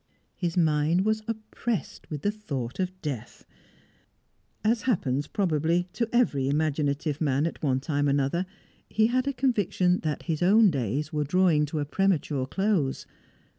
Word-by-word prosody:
His 175 -1 -2
mind 160 +2 +2
was 215 0 +1
oppressed 225 -1 -4
with 150 -3 -5
the 205 - +2
thought 140 - -5
of 185 0 -2
death. 125 -7 -6 1.2
As 225 +2 +2
happens, 145 - 0
probably, 170 -1 0
to 230 -2 -1
every 145 - +2
imaginative 150 0 0
man 140 -1 +2
at 165 - -4
one 130 -4 +1
time 145 0 0
or - - +3
another, 140 +6 0 0.4
he 220 +1 +3
had 255 +3 +1
a - - +2
conviction 205 -9 +1
that 155 -2 -3
his 160 -2 -2
own 205 +3 +6
days 140 - -2
were 150 -1 +1
drawing 155 -1 +3
to 155 - -4
a 145 - -1
premature 150 -6 0
close. 190 -7 0
160 Hz, 155 wpm, -27 LUFS, 145-195 Hz, 1.2 s, own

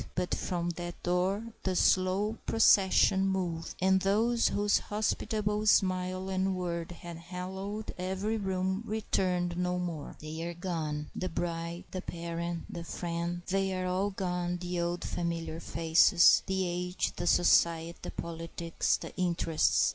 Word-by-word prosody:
But 180 0 -1
from 175 -1 -1
that 175 0 -6
door 195 +6 0
the 185 -1 -1
slow 190 +5 +2
procession 195 -3 +5
moved, 175 -4 -2
and 190 +1 +4
those 225 +5 +3
whose 205 0 +2
hospitable 210 0 -1
smile 185 -1 +2
and 190 0 0
word 170 -2 -3
had 170 -1 -8
hallowed 190 +5 -5
every 190 +4 -1
room 190 -1 -1
returned 185 -5 -1
no 180 0 0
more. 170 -5 -4
They 155 +1 -6
are 170 +1 -4
gone, 155 -4 -3
the 185 - -2
bride, 170 0 -3
the 185 - -4
parent, 170 0 -4
the 170 - -6
friend; 170 0 -3
"they 195 0 +1
are 185 - -2
all 185 +2 0
gone, 180 -2 -2
the 175 0 -3
old 175 +1 -1
familiar 170 -2 -3
faces," 165 +1 +5
the 190 -1 0
age, 180 +1 -2
the 175 - -2
society, 170 -1 +3
the - - -6
politics, 165 0 -2
the - - -9
interests. 165 - +2
180 Hz, 140 wpm, -30 LUFS, 170-190 Hz, -, procession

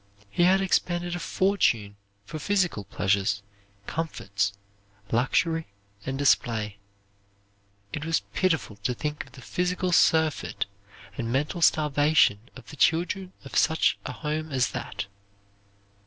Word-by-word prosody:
He 175 - 0
had 190 +2 +5
expended 175 -2 0
a - - -3
fortune 165 - +1 0.3
for 155 - -6
physical 180 - 0
pleasures, 100 +1 0 0.4
comforts, 100 - -2 0.6
luxury, 160 +7 +1 0.4
and 135 0 -2
display. 110 -7 +1 1.1
It 150 - -3
was 165 0 +1
pitiful 160 - 0
to 105 +5 -2
think 150 +2 -3
of 135 - -20
the 130 -2 -12
physical 180 +1 -1
surfeit 160 -2 +3 0.5
and 115 -1 -2
mental 150 +7 -1
starvation 150 -7 +4 0.2
of - - -12
the 150 - -11
children 180 +5 +1
of 135 - -9
such 160 0 +3
a - - -4
home 155 0 -3
as 130 -3 +1
that. - - -4
150 Hz, 125 wpm, -27 LUFS, 115-175 Hz, 1.1 s, had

